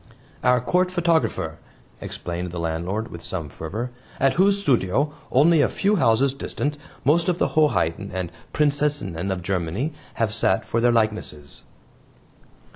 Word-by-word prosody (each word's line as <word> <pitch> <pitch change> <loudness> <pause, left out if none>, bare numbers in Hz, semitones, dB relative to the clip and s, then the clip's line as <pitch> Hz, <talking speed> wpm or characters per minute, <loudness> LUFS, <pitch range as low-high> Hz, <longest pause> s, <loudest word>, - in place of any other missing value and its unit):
"Our 125 0 +4
Court 180 +9 +1
photographer," 170 -3 0 0.4
explained 90 +1 -4
the 85 - -7
landlord 85 +7 -2
with 85 -1 -9
some 80 -5 -4
fervor, 110 - -5 0.3
"at 135 0 +3
whose 200 +2 +3
studio, 140 - +1 0.2
only 155 +4 +5
a - - +3
few 205 +1 +1
houses 130 0 +3
distant, 145 +1 -3 0.3
most 165 +6 +3
of 175 - +1
the - - +1
Hoheiten 150 - +1
and 90 -2 -3 0.2
Prinzessinen 145 - +1
of 95 -2 -2
Germany 95 - -1 0.2
have 110 -2 0
sat 95 -3 +1
for 115 - 0
their 120 0 +4
likenesses." 110 -11 -2
120 Hz, 140 wpm, -23 LUFS, 90-150 Hz, 0.4 s, only